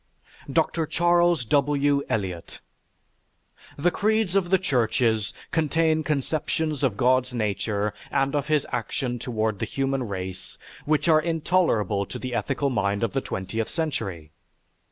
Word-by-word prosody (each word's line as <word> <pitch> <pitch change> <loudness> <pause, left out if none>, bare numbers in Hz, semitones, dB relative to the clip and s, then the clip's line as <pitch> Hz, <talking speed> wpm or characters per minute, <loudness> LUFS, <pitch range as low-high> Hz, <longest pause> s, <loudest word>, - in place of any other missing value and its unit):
DR. 160 +2 +1
CHARLES 175 -4 +3
W. 145 +2 +2
ELIOT 95 -6 -3 1.2
The 170 +5 +2
creeds 215 -1 +1
of 190 -3 +2
the 190 - +5
churches 115 - +1 0.2
contain 160 0 +2
conceptions 150 +1 -1
of 120 -7 +1
God's 125 0 +2
nature 105 -1 -1 0.2
and 135 +1 +1
of 145 0 -1
his 150 -2 +2
action 120 +1 -2
toward 110 -3 -2
the - - -1
human 135 -2 -1
race 95 -1 -6 0.3
which 155 +2 +1
are 155 -2 +5
intolerable 155 - +1
to - - -6
the 130 -1 -5
ethical 120 +5 0
mind 100 -2 0
of 115 - -1
the 135 - 0
twentieth 110 +3 -3
century. 95 - -3
135 Hz, 135 wpm, -25 LUFS, 110-155 Hz, 1.2 s, the